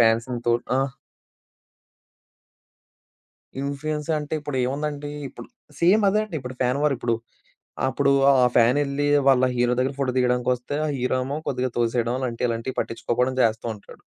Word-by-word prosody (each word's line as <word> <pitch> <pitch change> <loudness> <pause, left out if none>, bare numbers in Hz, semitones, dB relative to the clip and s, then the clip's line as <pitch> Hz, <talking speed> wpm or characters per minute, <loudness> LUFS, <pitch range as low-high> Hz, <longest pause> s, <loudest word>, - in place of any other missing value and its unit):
ఫ్యాన్స్‌ని 115 +2 +2
తో 120 - +4 0.3
ఆ! - - +3 2.8
ఇన్‌ఫ్లుయెన్స్ 145 +2 -3
అంటే 150 +1 -7
ఇప్పుడేముందండి. 145 +1 -2 0.2
ఇప్పుడు - - -11 0.3
సేమ్ 190 +6 +5
అదే 210 +2 +2
అండి 195 -7 -6
ఇప్పుడు 125 0 -7
ఫ్యాన్ 125 +2 +1
వార్ 150 -2 +3
ఇప్పుడు. 115 -1 0 0.7
అప్పుడు 140 +1 +2 0.2
ఆ - - +5 0.2
ఫ్యానెళ్లి 140 +4 +3 0.2
వాళ్ళ 130 -1 +5
హీరో 120 0 +2
దగ్గర 130 +2 0
ఫోటో 130 -2 +1
దిగడానికొస్తే, 125 +1 0
ఆ - - -1
హీరో 125 +1 0
ఏమో 140 +3 -3
కొద్దిగా 130 -1 -1
తోసేయడం 120 0 +1
అలాంటియి, 125 -2 -1
ఇలాంటియి 115 +3 -3
పట్టిచ్చుకోపోవడం 125 +2 -1
చేస్తూ 110 0 +1
ఉంటాడు. 100 - -15
130 Hz, 135 wpm, -24 LUFS, 120-145 Hz, 2.8 s, సేమ్